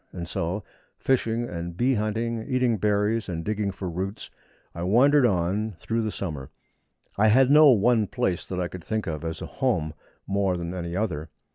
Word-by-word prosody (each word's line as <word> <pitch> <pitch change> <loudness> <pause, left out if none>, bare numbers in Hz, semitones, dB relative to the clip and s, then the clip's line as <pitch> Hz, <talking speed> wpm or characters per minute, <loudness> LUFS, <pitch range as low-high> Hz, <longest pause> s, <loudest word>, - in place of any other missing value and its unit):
And 85 -2 -6
so, 90 +4 -3 0.3
fishing 120 -2 0
and 85 0 -6
bee 130 +5 +2
hunting, 115 +1 -1
eating 125 -3 +1
berries 105 +2 +1
and 85 -2 -4
digging 105 -1 -1
for 95 0 -5
roots, 95 +4 -5 0.4
I 85 - -7
wandered 125 +8 +5
on 95 +1 0
all 110 - -6
through 115 +7 -2
the 110 - -1
summer. 75 -10 -5 0.7
I 110 - +5
had 130 +5 +5
no 150 0 +8
one 115 -2 +4
place 90 -2 -1
that 90 - -4
I 90 - 0
could 90 -1 -9
think 110 -1 -2
of 80 -3 -4
as 80 -1 -4
a - - -10
home 90 -13 +1 0.3
more 100 -2 0
than 85 0 -4
any 85 -1 -4
other. 85 -7 -2
100 Hz, 185 wpm, -25 LUFS, 85-115 Hz, 0.7 s, no